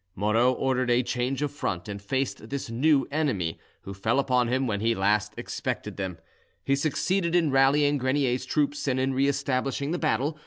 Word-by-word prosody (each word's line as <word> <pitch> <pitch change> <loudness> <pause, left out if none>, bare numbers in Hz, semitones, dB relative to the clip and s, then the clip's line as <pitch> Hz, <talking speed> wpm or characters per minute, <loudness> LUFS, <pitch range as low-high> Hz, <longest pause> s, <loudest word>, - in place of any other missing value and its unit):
Moreau 110 +5 +3
ordered 130 -1 0
a 120 +1 +3
change 125 +3 -2
of 145 - -1
front, 90 -11 -3
and 100 -1 -6
faced 130 0 -3
this 140 -4 -4
new 135 +4 +3
enemy, 130 - -1 0.2
who 100 - -7
fell 105 +6 0
upon 125 -3 +2
him 130 +2 0
when 105 -5 -1
he 115 +2 +1
least 105 +1 +1
expected - - -4
them; 95 -3 -4 0.5
he 135 - +2
succeeded 170 +5 0
in 165 -4 +3
rallying 140 +2 +3
Grenier's 130 -1 0
troops 145 -1 0
and 130 -1 +1
in 130 +1 0
re 135 +2 +2
establishing 140 +1 -1
the 175 - -1
battle. 155 0 0
130 Hz, 185 wpm, -26 LUFS, 115-140 Hz, 0.5 s, Moreau